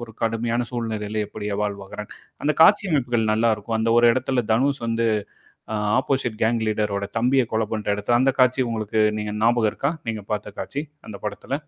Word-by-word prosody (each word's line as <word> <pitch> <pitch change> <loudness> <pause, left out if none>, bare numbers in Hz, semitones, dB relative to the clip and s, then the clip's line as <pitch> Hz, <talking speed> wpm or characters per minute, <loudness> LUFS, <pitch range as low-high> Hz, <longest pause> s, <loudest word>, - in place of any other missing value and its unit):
ஒரு 115 -2 -15
கடுமையான 115 +1 0
சூழ்நிலையில 110 -3 -2
எப்படி 105 -1 -6 0.2
வாழ்வாகுறான்கன்னு. 100 0 -6 0.3
அந்த 150 +1 +2
காட்சி 200 +3 +6
அமைப்புகள் 120 -6 +1
நல்லாருக்கும். 110 0 0
அந்த 115 +1 +1
ஒரு 120 - +6
இடத்துல 130 -1 0
தனுஷ் 135 +1 +1
வந்து, 115 0 +1 0.7
அ - - -2 0.2
ஆப்போசிட் 130 -4 0
கேங் 115 +1 +2
லீடர் 105 -1 0
ஓட 100 - -2
தம்பிய 130 +3 +3
கொலை 110 0 +1
பண்ற 110 -1 -3
இடத்துல 105 +4 +1
அந்த 135 - +4
காட்சி 130 +1 +4
உங்களுக்கு 110 -1 -1 0.2
நீங்க 105 0 -3
ஞாபகம் 115 -1 +3
இருக்கா? 140 - -1 0.2
நீங்க 110 -2 -3
பாத்த 105 -1 -3
காட்சி, 145 +2 -4 0.3
அந்த 105 - -7
படத்துல. 130 +5 -4
115 Hz, 175 wpm, -23 LUFS, 105-125 Hz, 0.7 s, காட்சி